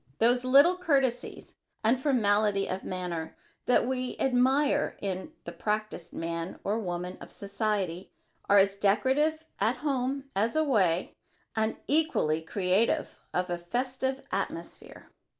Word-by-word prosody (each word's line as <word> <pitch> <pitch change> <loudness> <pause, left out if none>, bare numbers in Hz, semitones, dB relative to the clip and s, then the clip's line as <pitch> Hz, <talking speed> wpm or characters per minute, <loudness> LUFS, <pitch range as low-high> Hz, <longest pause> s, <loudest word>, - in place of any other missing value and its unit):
Those 245 +5 +3
little 280 +8 +6
courtesies 270 -8 -1 0.3
and 240 +4 +3
formalities 210 -7 +2
of 185 +1 -4
manner 180 -3 -4 0.3
that 250 - +4
we 255 -1 -2
admire 270 +3 +2
in 195 +8 -4
the - - -6
practised 215 -4 -3
man 165 +1 -4
or 210 +3 0
woman 180 -2 -4
of - - -10
society 200 -3 -2 0.4
are 200 - +6
as 195 0 +4
decorative 265 +10 +2
at 235 - +2
home 270 -1 0
as 220 +6 +1
away 205 - +2 0.4
and 220 0 0
equally 280 - +2
creative 185 +6 0
of 180 0 -1
a 175 - -2
festive 260 +7 -2
atmosphere. - - -5
220 Hz, 125 wpm, -29 LUFS, 185-265 Hz, 0.4 s, little